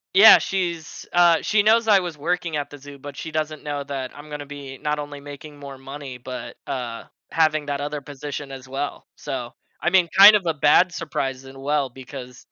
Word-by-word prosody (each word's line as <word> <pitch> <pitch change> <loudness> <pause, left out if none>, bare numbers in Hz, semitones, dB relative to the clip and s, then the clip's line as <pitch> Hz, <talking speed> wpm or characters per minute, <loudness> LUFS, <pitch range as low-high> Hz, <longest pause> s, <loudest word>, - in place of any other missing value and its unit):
Yeah, 215 +3 +10
she's 170 -4 -3
uh, 175 -2 +5
she 210 -1 +2
knows 225 +2 +4
I 200 - +7
was 175 -4 -5
working 170 +1 -2
at 145 -1 -3
the 145 - -10
zoo, 145 0 -12
but 145 +1 -10
she 160 - -6
doesn't 155 0 -3
know 145 -1 -3
that 135 -2 -5
I'm 150 +1 -11
gonna 150 -1 -6
be 140 -2 -9
not 150 +3 -2
only 145 -1 -6
making 145 +1 -10
more 140 -1 -9
money, 135 -1 -8
but, 125 +1 -7
uh, 120 -3 -4 0.3
having 155 -2 +2
that 145 -1 -3
other 145 +1 -3
position 145 0 -7
as 130 -1 -9
well. 135 +2 -4
So, 125 -2 -5 0.3
I - - +2
mean, 180 -1 +4
kind 210 +2 +11
of 195 - -7
a 165 - +1
bad 155 +5 +4
surprise 135 -5 -3
and 135 0 -12
well 145 -1 0
because 125 0 -10
145 Hz, 205 wpm, -23 LUFS, 135-160 Hz, 0.3 s, kind